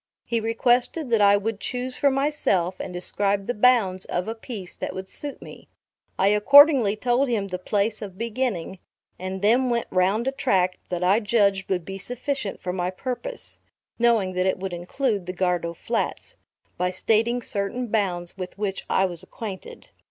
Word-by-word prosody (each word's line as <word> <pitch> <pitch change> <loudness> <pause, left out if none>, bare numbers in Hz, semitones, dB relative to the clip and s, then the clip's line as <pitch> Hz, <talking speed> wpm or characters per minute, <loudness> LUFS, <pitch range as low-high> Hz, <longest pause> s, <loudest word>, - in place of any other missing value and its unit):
He 235 - 0
requested 240 +5 +1
that 225 -2 +4
I 200 0 +6
would 210 +1 -3
choose 250 +2 -4
for 285 - +3
myself 265 - 0
and - - -5
describe 195 +2 -1
the 245 - -1
bounds 210 -5 +3
of 180 +2 -2
a 225 - -2
piece 220 -5 -8
that - - -5
would 190 0 -6
suit 285 +7 -8
me. - - -12 0.5
I 195 - +4
accordingly 250 +1 +7
told 245 +4 +1
him 205 -4 -1
the 180 -1 -4
place 210 +3 0
of 195 -3 -7
beginning, 225 -6 -2 0.4
and 185 +1 -5
then 245 +5 +4
went 235 -1 0
round 195 +6 +2
a - - +2
tract 190 -10 +1
that 180 0 -2
I 190 +4 +4
judged 200 -3 +1
would 180 -3 -1
be 195 +1 -6
sufficient 245 +1 -3
for 180 - -4
my 180 -1 -1
purpose, 255 - -4 0.4
(knowing 230 -6 +3
that 185 +1 +1
it 190 - +1
would 190 -1 -5
include 195 +3 -2
the 180 - -3
Gardow 175 -2 -1
Flats,) - - -3 0.4
by 180 0 +1
stating 225 +6 +1
certain 205 +5 -2
bounds 185 -6 -1
with 185 -1 -7
which 200 -2 -3
I 190 - +3
was 175 -3 -5
acquainted. 190 0 -8
205 Hz, 175 wpm, -24 LUFS, 185-240 Hz, 0.5 s, accordingly